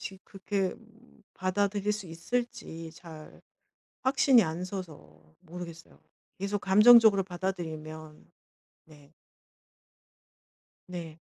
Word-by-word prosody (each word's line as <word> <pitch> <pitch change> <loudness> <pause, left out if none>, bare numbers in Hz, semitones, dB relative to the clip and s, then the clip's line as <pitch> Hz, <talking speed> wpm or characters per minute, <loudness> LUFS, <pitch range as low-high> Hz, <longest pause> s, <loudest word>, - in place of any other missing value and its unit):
지 190 - -7
그렇게 195 -1 -3 0.6
받아들일 200 +2 0
수 210 -3 -5
있을지 170 -2 -4
잘 160 -3 -12 0.6
확신이 260 -3 +5
안 165 +2 -3
서서 150 - -9
모르겠어요. 170 -1 -10 0.4
계속 200 +1 -2
감정적으로 210 0 +7
받아들이면 160 -4 -6 0.6
네. 145 -2 -19 1.8
네. 165 -3 -8
180 Hz, 200 characters per minute, -29 LUFS, 160-200 Hz, 1.8 s, 감정적으로